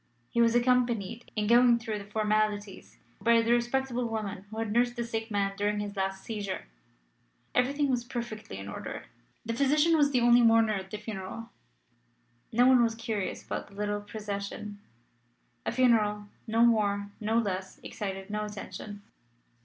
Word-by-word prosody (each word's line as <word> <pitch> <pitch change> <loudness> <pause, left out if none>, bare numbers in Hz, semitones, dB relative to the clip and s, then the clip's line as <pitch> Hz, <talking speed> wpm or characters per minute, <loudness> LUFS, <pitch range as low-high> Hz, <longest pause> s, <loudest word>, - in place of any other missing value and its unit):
He 235 - +2
was 230 0 +4
accompanied, 240 -3 +1
in 210 -1 0
going 240 +2 +6
through 220 -2 -4
the 200 - -9
formalities, 210 -1 -1 0.2
by 235 0 +5
the 230 - +1
respectable 240 +1 +1
woman 210 -3 -4
who 220 - -8
had 225 -2 -2
nursed 240 +2 +2
the 240 - -2
sick 225 -1 -4
man 200 -2 0
during 205 +1 0
his 205 0 -4
last 195 0 -2
seizure. 205 - -4 0.9
Everything 280 +4 +2
was 250 -3 0
perfectly 235 - -6
in 100 0 -7
order. 105 - -6 0.4
The 230 - -2
physician 295 +6 +3
was 290 -2 +4
the 255 -3 +2
only 240 0 +6
mourner 225 -1 +5
at 190 -2 -4
the 210 - -5
funeral. 210 +1 -7 1.0
No 245 +2 +4
one 255 -1 +6
was 230 -1 +2
curious 225 -4 -3
about - - -4
the 200 - -17
little 205 0 -2
procession. 205 -1 -6 0.9
A - - +1
funeral, 210 -5 +2 0.2
more 215 -3 +2
or 215 +1 0
less, 190 -4 -3
excites 195 -2 -5
no 210 0 -1
attention. 205 0 -8
220 Hz, 160 wpm, -29 LUFS, 205-235 Hz, 1.0 s, going